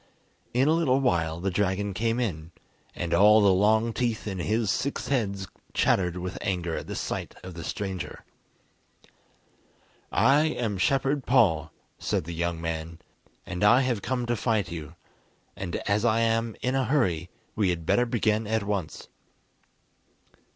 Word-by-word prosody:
In 130 +3 +2
a 155 - +4
little 145 -6 +2
while 85 -10 0
the 95 +2 -1
dragon 100 +1 0
came 115 +4 0
in, 85 -9 -3 0.4
and 85 -1 -3
all 105 +5 +7
the 100 -2 +5
long 110 +4 +3
teeth 120 -3 -1
in 95 -2 -4
his 110 +2 0
six 140 +7 -2
heads 100 -8 -1 0.3
chattered 90 -2 +2
with 90 +1 -5
anger 85 -3 -2
at - - -6
the - - -5
sight - - -4
of 95 0 -8
the 85 0 -7
stranger. 95 0 -5 1.9
"I 135 +8 +4
am 115 -10 -2
Shepherd 135 +4 +1
Paul," 80 - +3 0.3
said - - -1
the 85 +2 -6
young 85 0 -2
man, 80 0 -4 0.5
"and 90 - -4
I 105 +5 +6
have 125 -5 0
come 125 +1 -2
to 120 0 0
fight 110 -4 0
you, 80 -1 -7 0.6
and 90 -2 -5
as 105 +1 +2
I 115 -1 +3
am 115 0 +1
in 125 - +1
a 135 -1 +1
hurry 90 - +1 0.3
we 100 -4 +2
had 85 -2 -2
better 120 +8 +2
begin 110 -2 +1
at 110 0 0
once." 100 -5 -3
105 Hz, 160 wpm, -27 LUFS, 90-120 Hz, 1.9 s, all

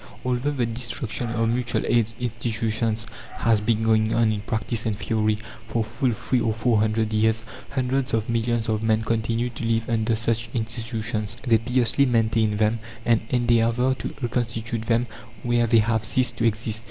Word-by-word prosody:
Although 125 +2 0
the 125 -4 0
destruction 115 0 -3
of 115 -1 0
mutual 120 0 0
aid 115 -2 +2
institutions 115 -1 -1 0.3
has 115 -2 +2
been 110 +1 +1
going 110 0 +3
on 115 -1 +3
in 105 -2 -2
practice 110 0 -2
and 105 -2 -1
theory, 110 -1 0 0.3
for 115 - 0
full 120 +5 -1
three 120 +2 0
or 110 - +1
four 115 0 +2
hundred 110 0 +1
years, 110 +1 +2 0.3
hundreds 130 0 0
of 115 -1 0
millions 115 0 0
of 110 -1 0
men 110 0 +2
continue 115 +2 0
to 120 - -7
live 115 -1 0
under 115 -1 +1
such 115 0 -1
institutions; 115 -1 -3
they 115 -3 +4
piously 125 +3 +2
maintain 110 -3 +2
them 110 +1 +2 0.3
and 115 -2 +3
endeavour 120 +1 +2
to - - -4
reconstitute 115 -1 -2
them 115 +1 +2 0.4
where 120 -1 +2
they 115 +1 +4
have 110 0 +2
ceased 125 +1 0
to 115 - +1
exist. 110 0 -2
115 Hz, 170 wpm, -24 LUFS, 110-120 Hz, 0.4 s, they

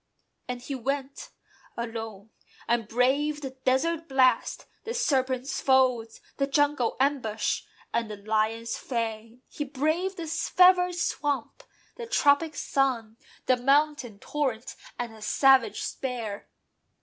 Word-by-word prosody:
And 245 -1 -5
he 275 - -5
went, 275 +2 -4 0.5
alone; 225 -3 -6 0.4
And 235 -2 +1
braved 280 +6 +1
the 265 - -4
desert 265 +6 0
blast, 255 -3 +2 0.2
the 465 - -4
serpent's 265 - 0
folds, 255 -4 +2 0.2
The 275 - +1
jungle's 290 -4 +1
ambush, 260 -6 0 0.3
and 230 -1 0
the 210 - -6
lion's 220 +2 -1
fang: 230 0 -4
He 295 - -5
braved 310 +7 -1
the 335 - -4
fevered 360 +2 +4
swamp, 290 -7 -2 0.4
the 470 -1 -6
tropic 310 -7 +3
sun, 240 -7 -1 0.3
The 255 - +3
mountain 275 -3 +1
torrent, 260 -1 -3 0.2
and 240 -2 -4
the 220 - -14
savage 265 +3 +3
spear. 230 -6 -5
260 Hz, 120 wpm, -27 LUFS, 230-290 Hz, 0.5 s, fevered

